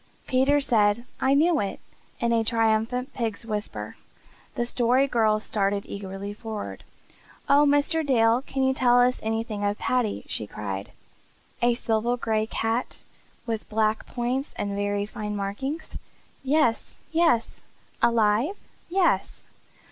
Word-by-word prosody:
Peter 270 +3 +3
said 230 -4 +2
"I 270 +1 +3
knew 320 +2 +4
it!" 200 - -3 0.4
in 235 - +1
a 225 -1 +3
triumphant 225 +4 +1
pig's 230 -2 -3
whisper. 210 -2 -4 0.6
The 240 - 0
Story 245 +2 +2
Girl 220 -4 +2
started 200 -2 -1
eagerly 200 0 -6
forward. 220 -1 -6 0.6
"Oh, 290 +1 +5
Mr. 290 +3 +2
Dale, 235 -3 +3
can 270 -1 -2
you 265 0 +3
tell 245 -2 +4
us 250 +1 +3
anything 220 -1 -2
of 205 0 0
Paddy?" 245 -5 -1
she 105 - -2
cried. 100 -2 -5 0.7
"A 240 0 +3
silver 235 +1 0
gray 220 -2 0
cat 225 +3 -2 0.5
with 225 -2 -4
black 215 0 0
points 255 +3 -2
and 200 -1 -2
very 205 0 -1
fine 210 0 -5
marking?" 210 +10 -3 0.6
"Yes, 270 -4 +1
yes!" 325 -8 +2 0.4
"Alive?" 230 - +3 0.3
"Yes." 370 0 +1
230 Hz, 130 wpm, -26 LUFS, 210-260 Hz, 0.7 s, Oh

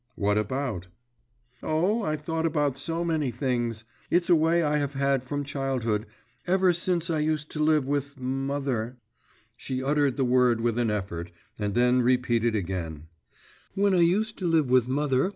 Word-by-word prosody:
'What 105 0 +1
about?' 105 -3 -2 0.7
'Oh, 185 +9 +1
I 155 -7 -1
thought 160 +2 -2
about 145 -4 0
so 165 +5 -3
many 155 -5 0
things. 120 -3 -2 0.2
It's 175 +1 +2
a - - +8
way 165 +2 +3
I 150 -1 +1
have 145 -1 -2
had 135 -1 +1
from 145 +2 -3
childhood; 130 -6 -2 0.4
ever 185 0 +3
since 175 -1 -1
I 160 - 0
used 150 -1 -1
to 155 - -5
live 155 -3 +3
with 140 0 -2
mother 130 -2 -2 0.3
' 115 +2 -35
She 130 +1 -4
uttered 145 -1 +1
the 135 - +2
word 125 -2 +3
with 120 0 0
an 120 -2 +1
effort, 95 -5 -3 0.3
and 105 -1 -2
then 125 +1 +4
repeated 120 -2 +2
again 85 -5 -4 0.7
'When 200 0 +2
I 180 - +3
used 210 +6 +1
to 185 - -1
live 160 -6 +2
with 125 -2 +4
mother. 135 +3 +1
135 Hz, 170 wpm, -26 LUFS, 120-155 Hz, 0.7 s, a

